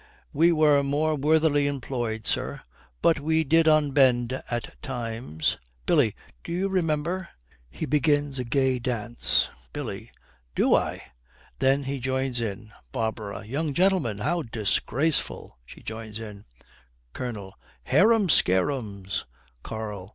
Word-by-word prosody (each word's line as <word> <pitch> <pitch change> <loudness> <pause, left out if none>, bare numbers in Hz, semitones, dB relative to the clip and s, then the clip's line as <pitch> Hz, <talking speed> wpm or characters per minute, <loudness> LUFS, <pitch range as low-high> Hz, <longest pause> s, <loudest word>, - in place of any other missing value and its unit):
'We 165 +4 +4
were 150 -3 +5
more 145 +3 +1
worthily 150 0 +3
employed, 120 -5 -3
sir, - - -1 0.4
but 165 -2 +4
we 160 +2 +2
did 160 +2 +4
unbend 135 -5 +3
at 120 -1 -5
times. 115 - -2 0.3
Billy, - - +3 0.3
do - - -7
you 185 +3 0
remember 175 0 -1 0.2
' - - -31
He 70 - -5
begins 145 -2 +1
a - - -1
gay 130 +1 +1
dance. 120 -1 +1 0.3
BILLY. - - -5 0.5
'Not - - +4
I.' - - -2 0.5
Then 135 +1 +3
he 135 0 -3
joins 130 -1 -1
in. 110 0 -5 0.2
BARBARA. 110 -4 -3
'Young 145 +5 -2
gentlemen, 180 - +2
how 170 +11 0
disgraceful!' 120 - -1
She - - -13
joins 110 -1 -6
in. 105 -2 -9 0.7
COLONEL. 105 -6 -5 0.3
'Harum 215 - +4
scarums!' 100 - +1 0.4
KARL. 105 - -6
130 Hz, 120 wpm, -26 LUFS, 110-155 Hz, 0.7 s, were